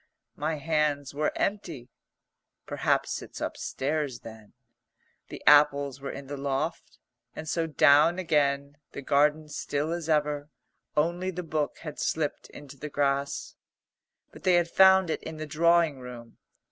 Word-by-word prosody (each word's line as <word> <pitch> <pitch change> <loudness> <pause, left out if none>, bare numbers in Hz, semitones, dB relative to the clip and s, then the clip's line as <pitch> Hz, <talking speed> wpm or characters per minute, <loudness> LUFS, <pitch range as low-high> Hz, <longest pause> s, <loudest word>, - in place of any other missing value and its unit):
My 155 +2 -2
hands 150 -2 -1
were 150 +2 0
empty. 165 - -3 0.7
"Perhaps - - 0
it's - - -10
upstairs 145 -2 -3
then?" 110 -2 -12 0.7
The - - -10
apples 140 -2 +5
were 140 - -5
in 140 - -7
the 145 +1 -6
loft. 140 +3 -3 0.4
And 155 - -7
so 165 +1 -1
down 155 +2 +5
again, 145 -4 0 0.2
the 140 - -7
garden 150 +3 +2
still 145 +1 -3
as 170 -1 -4
ever, 150 -1 0 0.5
only 175 +4 +1
the 180 -1 -5
book 155 -2 -2
had 150 -3 -7
slipped 155 -2 -2
into 140 -1 -12
the 150 +3 -6
grass. 140 -1 -1 0.8
But - - -14
they 185 -2 +3
had 170 -1 +1
found 190 -2 +6
it - - -3
in 160 -1 -7
the 155 - -5
drawing 165 -1 +2
room. 120 -2 -11
150 Hz, 145 wpm, -27 LUFS, 140-160 Hz, 0.8 s, found